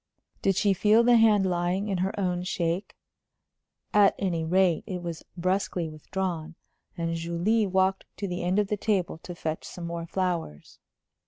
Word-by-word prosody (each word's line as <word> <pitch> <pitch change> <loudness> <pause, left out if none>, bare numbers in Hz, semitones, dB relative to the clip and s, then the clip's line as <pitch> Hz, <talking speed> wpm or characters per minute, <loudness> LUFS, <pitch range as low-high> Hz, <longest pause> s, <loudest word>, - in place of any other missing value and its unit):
Did 195 -1 +2
she 200 +1 +3
feel 215 +4 +4
the 240 0 +6
hand 215 -3 +5
lying 180 +2 0
in 195 -3 -1
her 190 +3 -1
own 180 -2 0
shake? 175 +1 -2 1.0
At 205 -1 +5
any 175 -4 -1
rate, 180 0 +2
it 180 -2 -4
was 170 -2 -5 0.2
brusquely 185 -1 -1
withdrawn, 165 +1 -4 0.4
and 165 0 -1
Julie 170 +7 +1
walked 190 0 +1
to 200 - -3
the 180 -1 -3
end 180 +2 0
of 205 -2 +1
the 210 - 0
table 190 -6 0
to 175 +1 -8
fetch 160 -1 -3
some 175 - -7
more 170 0 -4
flowers. 170 - -3
180 Hz, 165 wpm, -27 LUFS, 170-195 Hz, 1.0 s, the